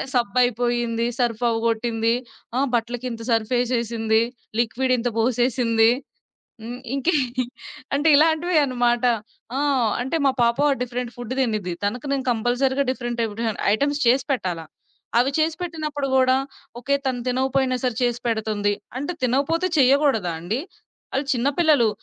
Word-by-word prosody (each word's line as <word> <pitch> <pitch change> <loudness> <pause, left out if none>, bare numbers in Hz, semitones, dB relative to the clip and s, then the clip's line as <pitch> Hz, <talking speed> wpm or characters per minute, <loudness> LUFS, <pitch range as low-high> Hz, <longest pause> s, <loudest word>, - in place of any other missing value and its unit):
సబ్బయిపోయింది, 240 0 +1
సర్ఫ్‌వ్వగొట్టింది, 230 -1 +1 0.4
ఆ! - - +3 0.2
బట్టలకి 240 +1 -2
ఇంత 230 - -7
సర్ఫేసేసింది, 230 -1 +1 0.4
లిక్విడ్ 240 +3 +1
ఇంత 245 +1 -1
పోసేసింది, 230 -1 +3 0.7
హ్మ్ 245 +2 -7
ఇంకేం 290 +3 +1 0.7
అంటే 290 +3 +2
ఇలాంటి‌వేన్నమాట 290 -7 +2 0.5
ఆ! - - 0 0.4
అంటే 265 +6 -2
మా 270 - +4
పాప 235 0 +2 0.2
డిఫరెంట్ 245 0 -4
ఫుడ్ 245 +1 -4
తినిద్ది 215 -8 -1
తనకి 240 +7 -2
నేను 270 -1 -1
కంపల్సరీగా 250 +4 +1
డిఫరెంట్ 240 -2 -4
టైపు 220 -2 -2 0.4
ఐటెమ్స్ 285 +4 0
చేసి 260 +2 +3
పెట్టాలా. 175 -10 -3 0.5
అవి 250 +3 +3
చేసి 315 0 +1
పెట్టినప్పుడు 305 -5 -3
కూడా 260 0 +4 0.4
ఓకే 260 +4 0
తను 255 -2 -1
తినకపోయినా 260 0 +1
సరే 250 -2 +1
చేసి 240 -1 +1
పెడుతుంది. 215 -3 0 0.3
అంటే 290 +6 -3
తినకపోతే 280 +8 +1
చేయకూడదా 265 - +3
అండి? 190 +8 -2 0.6
అళ్లు 270 +1 -1
చిన్న 250 +3 +1
పిల్లలు, 295 -9 +4
245 Hz, 125 wpm, -23 LUFS, 230-270 Hz, 0.7 s, మా